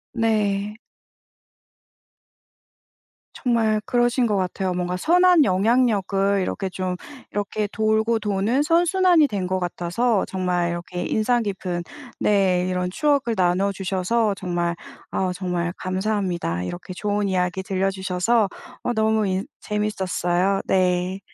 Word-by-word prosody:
네. 210 -2 0 2.6
정말 225 -4 +1
그러신 240 0 +2
것 210 -2 +1
같아요. 185 0 -1
뭔가 180 0 -2
선한 350 - +5
영향력을 200 -2 +2
이렇게 190 +1 -2
좀 185 0 -3 0.4
이렇게 205 +1 -2
돌고 220 +1 +1
도는 210 +6 +1
선순환이 345 0 +4
된 200 -7 -3
것 185 0 0
같아서 185 +5 0
정말 180 -2 -1
이렇게 175 +1 -5
인상 235 +4 +1
깊은 185 -3 -3 0.4
네 190 -3 +2
이런 180 0 -1
추억을 275 +1 +1
나눠 185 +2 +2
주셔서 195 +3 0
정말 175 -2 -1 0.4
아우 185 -1 -1
정말 180 -2 -2
감사합니다. 185 - -1
이렇게 175 - -6
좋은 205 0 -1
이야기 185 0 0
들려 195 0 0
주셔서 190 +4 +1 0.4
어 245 - 0
너무 220 -1 +2
인 190 +1 -1
재밌었어요. 195 -2 0
네. 185 0 +1
195 Hz, 260 characters per minute, -23 LUFS, 180-220 Hz, 2.6 s, 선한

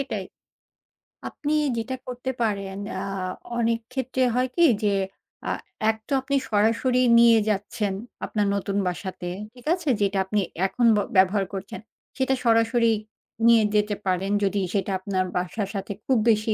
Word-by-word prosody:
এটাই। 220 -8 -3 1.0
আপনি 295 +1 -3 0.2
যেটা 240 +3 -2
করতে 250 +1 -4
পারেন 200 -3 -1 0.2
আ - - -3 0.6
অনেক 230 -1 +1
ক্ষেত্রে 260 0 -1
হয় 255 +1 +2
কি? 345 - +4 0.2
যে, 205 -1 +3 0.5
আ - - 0 0.4
এক 220 - +1
তো - - -17
আপনি 280 +2 -1
সরাসরি 230 +4 +2 0.2
নিয়ে 235 -1 +7
যাচ্ছেন 205 0 -1 0.3
আপনার 210 -2 0
নতুন 200 0 -2
বাসাতে, 180 0 -4 0.2
ঠিক 245 -1 -16
আছে? 350 -4 -2
যেটা 200 0 +1
আপনি 210 +2 0 0.3
এখন 240 +4 0
ব - - +2 0.2
ব্যবহার 195 +1 +4
করছেন, 195 0 -6 0.4
সেটা 265 0 +1
সরাসরি 230 0 +4 0.6
নিয়ে 230 -1 +6
যেতে 210 0 +2
পারেন 190 +2 0
যদি 200 +1 +1
সেটা 200 -1 0
আপনার 185 -1 -1
বাসার 185 +3 -2
সাথে 195 +1 -4
খুব 260 - +3
বেশি 215 0 +2
215 Hz, 150 wpm, -25 LUFS, 195-245 Hz, 1.0 s, নিয়ে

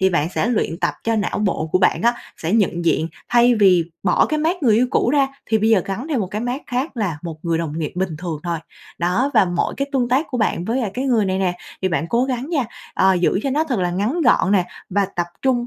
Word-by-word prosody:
thì 190 0 +3
bạn 160 -2 +1
sẽ - - +1
luyện 210 -8 -1
tập 175 - 0
cho 225 0 +1
não 205 -2 -1
bộ 195 -6 -1
của - - +4
bạn 185 - +2
á, 235 +1 +3 0.2
sẽ 165 +2 -3
nhận 185 -6 +1
diện 165 -1 +1 0.2
thay 240 0 +5
vì 190 -6 +4 0.2
bỏ 180 - +3
cái 305 - -1
mác 325 +2 0
người 225 -5 +4
yêu 250 +2 +3
cũ 240 - +2
ra 275 -2 +3 0.2
thì 220 - +2
bây 220 +1 +2
giờ 210 -5 +4
gắn 225 +10 -4
thêm 280 -7 0
một 195 - -1
cái 205 +4 -4
mác 245 +5 -3
khác 255 +3 -3
là 190 -9 -2
một 165 -2 -6
người 165 -1 0
đồng 160 -1 -3
nghiệp 155 -2 -3
bình 180 -4 -2
thường 165 -3 -4
thôi. 170 -1 -2 0.4
Đó, 180 +11 +1
và - - +6
mỗi 175 -1 -1
cái 275 0 -2
tương 250 -3 +1
tác 265 +6 +2
của 250 - -3
bạn 215 -6 0
với 235 +6 -1
lại 220 -5 -2
cái 255 - -2
người 235 -6 +2
này 190 0 -1
nè, 180 -2 0 0.3
thì 190 - +2
bạn 165 -2 -1
cố 240 +5 +2
gắng 260 +2 -3
nha, 290 -7 +1 0.3
ờ, 190 0 +4
giữ 180 +1 +2
cho 275 - -1
nó 300 +4 +1
thật 260 -8 -2
là 180 -1 0
ngắn 210 - -1
gọn 240 - +3
nè, 185 -3 +3 0.2
và 200 +1 +1
tập 175 -1 0 0.2
trung 255 -2 +2
210 Hz, 270 wpm, -20 LUFS, 180-250 Hz, 0.4 s, và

